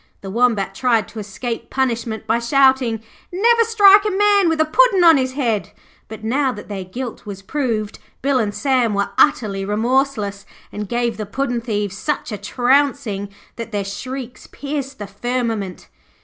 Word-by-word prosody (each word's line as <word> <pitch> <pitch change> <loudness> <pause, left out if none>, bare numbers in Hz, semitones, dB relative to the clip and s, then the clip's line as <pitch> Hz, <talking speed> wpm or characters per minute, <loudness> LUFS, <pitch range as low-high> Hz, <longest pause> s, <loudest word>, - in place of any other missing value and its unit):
The 195 - -7
Wombat 215 -4 +1
tried 230 -1 +1
to 225 - -8
escape 225 +3 -5
punishment 235 -4 -2
by 225 +2 +1
shouting, 260 -2 +2 0.3
'Never 460 +6 +4
strike 410 -3 +6
a 425 - 0
man 405 -2 +3
with 325 -1 0
a 315 - +4
Puddin' 395 +2 +4
on 330 -3 +7
his 260 -1 -1
head'; 235 -7 -1 0.3
but, 220 0 -10
now 260 +4 +1
that 210 -3 -10
their 195 -2 -4
guilt 235 +5 -7
was 195 -1 -7
proved, 225 -4 -2 0.2
Bill 275 -1 +2
and 210 -3 0
Sam 250 -3 +1
were 200 0 -1
utterly 205 -9 +2
remorseless, 215 -1 0 0.3
and 210 -1 -6
gave 235 -2 -1
the 215 -2 -5
puddin' 245 +2 -2
thieves 205 -3 -3
such 300 -5 -2
a 210 - -3
trouncing 245 -2 +1 0.3
that 230 -1 -6
their 205 -2 -2
shrieks 250 +5 -7
pierced 280 -1 -5
the 205 - -6
firmament. 225 -2 -3
240 Hz, 165 wpm, -20 LUFS, 210-275 Hz, 0.3 s, on